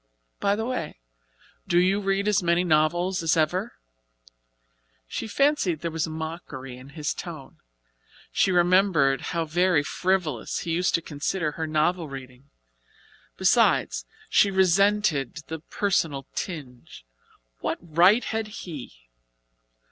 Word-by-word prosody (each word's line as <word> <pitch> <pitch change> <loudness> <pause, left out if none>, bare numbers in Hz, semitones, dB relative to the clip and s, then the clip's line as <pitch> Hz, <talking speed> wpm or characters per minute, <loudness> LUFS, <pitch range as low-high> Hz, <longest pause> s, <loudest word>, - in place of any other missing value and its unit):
By 200 0 +2
the 220 +1 -3
way, 200 - -4 0.7
do 175 - +2
you 185 +3 +3
read 195 +1 0
as 210 -1 +3
many 170 0 +2
novels 175 +3 +2
as 165 0 +2
ever?" 180 +8 0 1.3
She 225 - -4
fancied 220 - +1
there 170 - -3
was 165 0 -1
mockery 160 -5 -6
in 130 +2 -13
his 150 -1 -1
tone. 160 -7 -9 0.7
She 190 - +2
remembered 175 -6 +3
how 165 -1 -2
very 175 -1 +2
frivolous 175 -6 -1
he 170 - -4
used 180 +3 +1
to 170 - -1
consider 150 +2 -2
her 160 +1 -4
novel 155 +2 +1
reading. 130 0 -10 0.9
Besides, - - +2 0.2
she 200 - +4
resented 190 -6 +2
the 160 0 -4
personal 165 -6 -1
tinge. 130 - -7 0.5
What - - -2
right 175 +8 +4
had 220 -1 -2
he? 145 - -9
170 Hz, 125 wpm, -25 LUFS, 150-190 Hz, 1.3 s, she